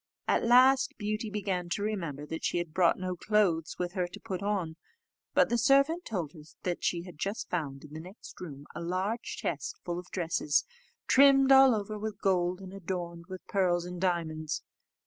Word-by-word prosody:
At - - +2
last 260 +3 +5
Beauty 215 +1 -2
began 195 -4 -2
to 200 - -3
remember 170 -9 -3
that 160 +2 -6
she - - 0
had 170 -3 -3
brought 175 -1 +4
no 185 -1 -3
clothes 180 -5 +1
with 175 -1 -2
her 180 -3 -1
to 175 - -11
put 185 -1 -5
on; 195 -6 -1 0.6
but - - +5
the 240 - +1
servant 275 +8 +3
told 180 -9 -3
her 160 - -12 0.4
she 170 -1 -1
had 175 -4 -12
just 200 +5 -3
found 140 -6 -3
in 150 0 -12
the 155 - -6
next 185 +5 -12
room 145 -5 -8
a - - -6
large 185 +7 -2
chest 145 -4 -3
full 175 0 -2
of 180 - -11
dresses, 165 -4 0 0.4
trimmed 270 0 +6
all 265 -2 +8
over 210 0 -4
with 215 0 -5
gold, 180 -1 +1
and 190 0 -9
adorned 175 -3 -5
with 185 -1 -8
pearls 175 -3 +1
and 180 0 -7
diamonds. 155 -4 -1
185 Hz, 185 wpm, -30 LUFS, 170-210 Hz, 0.6 s, all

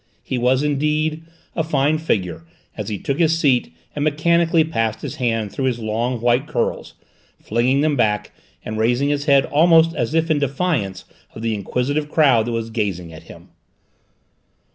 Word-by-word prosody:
He 130 - -3
was, 130 +3 +2
indeed, 150 +2 0 0.3
a 160 - 0
fine 150 0 +1
figure 90 - -2 0.3
as - - -5
he 105 - -3
took 140 - -3
his 165 -1 +3
seat 135 -6 +2 0.2
and 145 - -2
mechanically 165 +2 +2
passed 115 -9 -2
his 150 - -5
hand 115 -5 -1
through 135 - -3
his 125 -3 0
long 115 +2 -2
white 120 +4 +2
curls, 135 -6 -2 0.4
flinging 125 +5 +1
them 150 -1 +1
back 105 -5 0 0.3
and 110 0 -4
raising 120 +5 +1
his 145 0 -1
head 140 -2 +4
almost 165 +2 +4
as 120 +6 -2
if 165 0 +1
in 150 - +2
defiance 135 - -1 0.3
of 110 - -8
the 115 -1 0
inquisitive 130 +8 -2
crowd 135 -8 +3
that - - -2
was 115 -1 -3
gazing 95 -7 -3
at 80 - -12
him. - - -13
135 Hz, 170 wpm, -20 LUFS, 115-155 Hz, 0.4 s, head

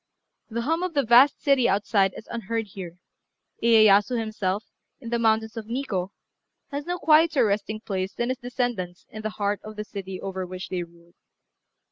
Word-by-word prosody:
The 235 +1 -2
hum 325 +6 0
of 365 -3 -3
the 280 - +3
vast 245 +5 +6
city 270 -4 +4
outside 195 -1 +2
is 220 - -10
unheard 225 -1 -3
here: 180 -3 -8 0.6
Iyéyasu 220 0 +5
himself, 210 -2 -2 0.4
in 235 -4 -8
the 235 - +1
mountains 220 0 +1
of 220 -1 -6
Nikkô, 225 -7 -2 0.6
has 285 +2 -4
no 355 0 -1
quieter 310 -5 +4
resting 215 +1 -1
place 190 -3 -3
than 240 +1 -1
his 255 - -2
descendants 240 -8 -3
in 215 - -7
the 215 - -2
heart 205 0 0
of 215 0 -9
the 210 - -4
city 190 -3 -7
over 190 -1 -4
which 185 +1 -7
they 180 -1 -2
ruled. 170 0 -13
215 Hz, 175 wpm, -25 LUFS, 195-245 Hz, 0.6 s, vast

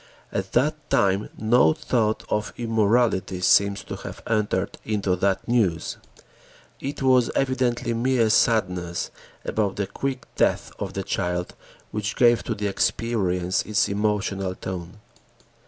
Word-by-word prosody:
At - - -3
that - - 0
time 100 +1 +2
no 110 -6 +4
thought 110 +1 0
of 105 0 -2
immorality 110 -4 +1
seems 100 +2 +4
to - - -6
have - - -9
entered 105 -3 -1
into 100 -4 0
that 95 +1 0
news. 105 -9 +1 0.8
It 140 0 -4
was 130 -2 +4
evidently 130 -3 0
mere 115 -1 +2
sadness 90 -7 +1 0.3
about 100 -3 0
the 100 - -1
quick 130 +4 -4
death - - +1
of - - -4
the 100 - -3
child 90 -1 -2 0.4
which 105 0 -3
gave 120 -4 +5
to - - -2
the 105 - -4
experience 95 -3 0
its 105 -1 +1
emotional 100 -2 -1
tone. 95 +2 -7
105 Hz, 130 wpm, -24 LUFS, 95-115 Hz, 0.8 s, gave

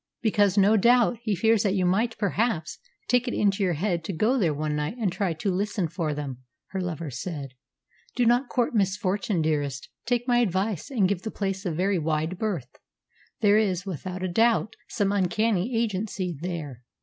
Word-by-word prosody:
"Because, 205 -3 +3
no 205 +2 +5
doubt, 240 +2 +4
he 215 -4 0
fears 225 +2 +3
that 200 -2 +1
you 185 -2 +1
might 220 +6 +1
perhaps 205 -5 -1 0.3
take 250 +1 +2
it 245 - -1
into 200 -1 +1
your 185 -3 +2
head 175 0 -1
to - - -2
go 215 +10 +2
there 185 - +2
one 150 +1 -2
night 150 +9 -3
and 215 -6 0
try 190 0 -1
to 175 +5 -2
listen 195 -1 -1
for 160 -1 -2
them," 140 -4 -5 0.3
her 190 - -3
lover 170 -4 -4
said. 140 +1 -5 0.6
"Do 245 - +2
not 245 +2 +3
court 245 -1 0
misfortune, 195 -3 0
dearest. 145 -3 -1 0.2
Take 245 0 0
my 240 -1 +4
advice, 195 -4 0
and 225 -9 +2
give 190 -2 -1
the 220 - -4
place 195 -2 -3
a - - 0
very 185 +3 +1
wide 160 +3 -1
berth. 170 - -3 0.6
There 210 0 +5
is, 185 -4 0
without 185 0 -5
a - - 0
doubt, 220 +3 +2
some 200 -3 0
uncanny 205 +3 +1
agency 195 -5 -2
there." 155 -8 -5
195 Hz, 185 wpm, -26 LUFS, 170-220 Hz, 0.6 s, no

